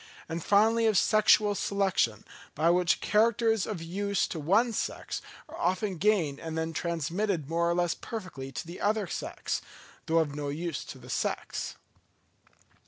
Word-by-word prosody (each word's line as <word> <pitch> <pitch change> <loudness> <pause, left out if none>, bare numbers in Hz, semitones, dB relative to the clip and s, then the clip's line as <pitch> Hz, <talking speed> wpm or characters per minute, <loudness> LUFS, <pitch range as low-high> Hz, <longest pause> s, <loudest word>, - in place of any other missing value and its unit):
and 165 0 -4
finally 225 +3 +4
of 215 -3 +3
sexual 215 0 +5
selection, 190 - 0 0.3
by 160 +3 +3
which 175 0 +2
characters 225 -1 +2
of 195 -7 -4
use 200 +4 0
to 165 - -5
one 210 +10 +3
sex - - -3 0.3
are - - -10
often 185 +1 0
gained 175 -8 +2
and 160 0 -5
then 160 0 -2
transmitted 170 +1 -1
more 170 +2 +1
or 170 - +1
less 175 -1 +1
perfectly 185 - -7
to 135 - -5
the 170 +2 -9
other 210 0 +1
sex, - - -3 0.5
though 165 - +2
of 155 -3 +2
no 145 -1 -3
use 160 +1 -3
to - - -9
the - - -14
sex. - - -2
180 Hz, 160 wpm, -29 LUFS, 160-210 Hz, 0.5 s, sexual